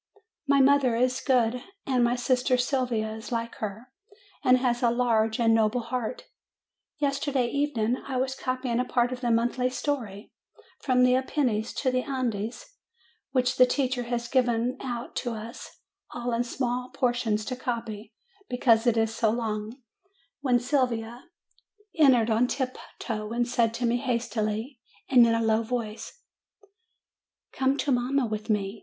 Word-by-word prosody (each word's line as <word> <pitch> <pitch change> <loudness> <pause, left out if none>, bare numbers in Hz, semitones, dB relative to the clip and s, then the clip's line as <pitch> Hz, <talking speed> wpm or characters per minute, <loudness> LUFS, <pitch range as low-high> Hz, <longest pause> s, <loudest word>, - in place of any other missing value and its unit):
My 280 0 +5
mother 270 -3 +4
is 255 +2 +1
good, 250 -2 +2 0.2
and 255 -3 +2
my 240 +1 +2
sister 255 +1 +1
Sylvia 245 -4 -1
is 220 +2 -9
like 230 -1 -2
her, 220 +4 -6 0.5
and 255 0 +5
has 245 -2 0
a 240 - +4
large 230 -2 +1
and 225 -1 +4
noble 225 +2 +2
heart. 245 0 -4 0.7
Yesterday 275 -3 0
evening 255 -4 0
I 265 -2 -2
was 260 +1 0
copying 255 -2 -2
a - - +2
part 245 -1 +1
of 255 0 -5
the 240 - 0
monthly 240 +2 +1
story, 240 -7 -4 0.5
From 250 -2 +2
the 250 0 +5
Apennines 255 -4 0
to 260 - 0
the 255 0 +1
Andes, 245 - -3 0.7
which 255 -1 +1
the 255 - +7
teacher 255 -1 0
has 240 0 -3
given 245 -1 +1
out 240 -1 -5
to 240 -2 -2
us 225 +2 -8 0.4
all 240 0 -4
in 235 +1 +1
small 250 0 -2
portions 235 -4 0
to 255 - -3
copy, 230 -4 -5 0.4
because 245 -2 +3
it 235 -1 +3
is 225 0 +1
so 225 -1 +1
long, 220 +2 -3 0.6
when 255 -4 +2
Sylvia 245 -2 -1 0.7
entered 250 -7 +4
on 230 +3 +3
tiptoe, 235 -4 -4
and 240 0 0
said 235 -2 +2
to 245 - -1
me 235 +1 +2
hastily, 235 0 -2 0.3
and 245 -3 +6
in 230 - +2
a 230 - 0
low 220 0 +2
voice: 230 - -5 1.3
"Come 265 +1 +1
to 290 - 0
mamma 255 +2 +1
with 215 -1 -5
me. 205 0 -1
245 Hz, 155 wpm, -27 LUFS, 230-255 Hz, 1.3 s, the